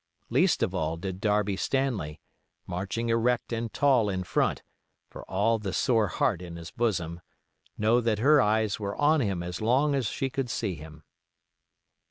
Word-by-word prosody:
Least -, -, +3 dB
of 95 Hz, -, 0 dB
all 80 Hz, -2 st, -1 dB
did 95 Hz, +1 st, -5 dB
Darby 105 Hz, -2 st, +1 dB
Stanley, 110 Hz, -, -1 dB, 0.5 s
marching 100 Hz, +6 st, -3 dB
erect 115 Hz, +1 st, +1 dB
and 115 Hz, -1 st, -3 dB
tall 130 Hz, -7 st, +3 dB
in 95 Hz, -2 st, -2 dB
front, 90 Hz, -, 0 dB, 0.5 s
for -, -, -9 dB
all 110 Hz, +4 st, +2 dB
the 100 Hz, -3 st, -4 dB
sore 115 Hz, -4 st, +2 dB
heart 85 Hz, -, 0 dB
in 85 Hz, -2 st, -8 dB
his 85 Hz, 0 st, -8 dB
bosom, 85 Hz, -8 st, -1 dB, 0.6 s
know 115 Hz, +3 st, +3 dB
that 115 Hz, -2 st, +1 dB
her 145 Hz, +6 st, +5 dB
eyes 110 Hz, -1 st, +1 dB
were 100 Hz, -1 st, -3 dB
on 150 Hz, +1 st, +3 dB
him 95 Hz, -7 st, -1 dB
as 90 Hz, +2 st, -5 dB
long 130 Hz, +6 st, +2 dB
as 135 Hz, -5 st, 0 dB
she 135 Hz, +5 st, -2 dB
could 135 Hz, -2 st, -2 dB
see 110 Hz, -3 st, -2 dB
him. 80 Hz, -1 st, -11 dB
105 Hz, 170 wpm, -28 LUFS, 90-120 Hz, 0.6 s, her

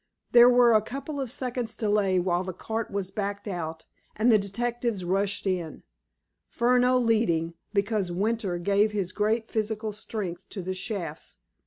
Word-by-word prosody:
There 240 Hz, 0 st, +8 dB
were 245 Hz, -1 st, +6 dB
a 215 Hz, -, +5 dB
couple 275 Hz, +6 st, -5 dB
of 260 Hz, -, -3 dB
seconds' 245 Hz, -2 st, -3 dB
delay 205 Hz, -4 st, +2 dB
while 175 Hz, 0 st, 0 dB
the 185 Hz, 0 st, -5 dB
cart 225 Hz, +3 st, -3 dB
was 195 Hz, -2 st, -3 dB
backed 200 Hz, +1 st, -4 dB
out, 165 Hz, -4 st, -5 dB, 0.3 s
and 230 Hz, +3 st, +3 dB
the 215 Hz, -, +6 dB
detectives 230 Hz, 0 st, -2 dB
rushed 195 Hz, +3 st, 0 dB
in, 175 Hz, -5 st, -2 dB, 0.6 s
Furneaux 250 Hz, +1 st, +3 dB
leading, 215 Hz, -9 st, +1 dB, 0.2 s
because 205 Hz, -2 st, 0 dB
Winter 200 Hz, 0 st, -1 dB
gave 200 Hz, +4 st, +2 dB
his 195 Hz, -3 st, -1 dB
great 220 Hz, +3 st, 0 dB
physical 220 Hz, 0 st, -1 dB
strength 200 Hz, -4 st, -5 dB
to 190 Hz, -, -6 dB
the 185 Hz, +1 st, -3 dB
shafts. 185 Hz, -5 st, -5 dB
210 Hz, 155 wpm, -27 LUFS, 185-230 Hz, 0.6 s, There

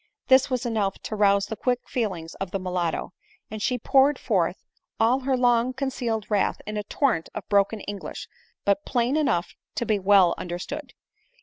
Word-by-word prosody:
This 260 Hz, +1 st, +6 dB
was 255 Hz, -1 st, -1 dB
enough 210 Hz, -5 st, 0 dB
to 215 Hz, -, -4 dB
rouse 200 Hz, -1 st, +3 dB
the 220 Hz, -, -5 dB
quick 245 Hz, +3 st, -1 dB
feelings 185 Hz, -9 st, -3 dB
of 195 Hz, -, -2 dB
the 195 Hz, -, -2 dB
mulatto, 180 Hz, -3 st, -2 dB, 0.4 s
and 215 Hz, -1 st, -5 dB
she 250 Hz, +4 st, +1 dB
poured 270 Hz, +4 st, +4 dB
forth 185 Hz, -5 st, -1 dB, 0.3 s
all 235 Hz, +4 st, +4 dB
her 265 Hz, 0 st, 0 dB
long 245 Hz, 0 st, +3 dB
concealed 250 Hz, -5 st, -2 dB
wrath 205 Hz, -2 st, +1 dB
in 210 Hz, -, -5 dB
a 210 Hz, -, -1 dB
torrent 220 Hz, -, 0 dB
of 215 Hz, -, -6 dB
broken 205 Hz, +1 st, +2 dB
English, 205 Hz, -1 st, -6 dB, 0.4 s
but 200 Hz, 0 st, +2 dB
plain 245 Hz, +2 st, 0 dB
enough 270 Hz, -, +1 dB, 0.2 s
to 235 Hz, -, -1 dB
be 215 Hz, -2 st, +1 dB
well 195 Hz, -2 st, +5 dB
understood. 265 Hz, -, -6 dB
215 Hz, 175 wpm, -25 LUFS, 195-250 Hz, 0.4 s, This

